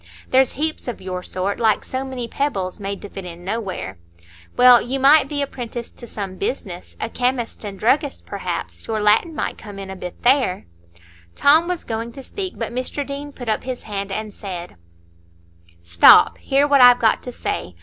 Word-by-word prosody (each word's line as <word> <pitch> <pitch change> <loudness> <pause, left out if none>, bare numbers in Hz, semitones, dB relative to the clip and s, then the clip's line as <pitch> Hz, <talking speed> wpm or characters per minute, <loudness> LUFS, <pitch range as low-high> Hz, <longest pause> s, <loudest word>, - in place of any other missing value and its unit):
There's 260 0 +4
heaps 310 +1 -3
of 245 - -4
your 185 -1 -5
sort, 185 +2 -3
like 220 -3 +2
so 260 +1 -3
many 260 -3 -5
pebbles, 200 -11 -2
made 200 0 -5
to 205 - -7
fit 195 - -8
in 175 0 -10
nowhere. 190 - -4 0.6
Well, 250 -1 +8
you 265 +2 -2
might 275 +1 +6
be 285 -1 -1
apprenticed 240 -3 -7
to 240 - -10
some 195 -4 -6
business,—a 195 -4 -5
chemist's 245 -2 -2
and 200 -2 -6
druggist's 275 +7 +1
perhaps; - - -5
your 220 -1 -1
Latin 215 +10 +3
might - - -3
come 205 -3 -10
in 195 -1 -7
a - - -6
bit 180 -1 -9
there——" 250 -7 +2 0.7
Tom 315 +4 +5
was 360 -2 -3
going 230 +1 -4
to 270 - -10
speak, 375 +5 -6
but 230 0 -4
Mr 255 +3 -2
Deane 285 +1 -6
put 245 -3 -10
up 215 - 0
his 255 -1 -5
hand 200 -2 -5
and 215 +1 -4
said: 180 -4 -7 1.1
"Stop! 85 0 +6
hear 275 +1 +2
what 280 -2 +5
I've 245 0 +9
got 225 -2 +2
to 250 - -7
say. 90 - -4
235 Hz, 185 wpm, -21 LUFS, 195-270 Hz, 1.1 s, I've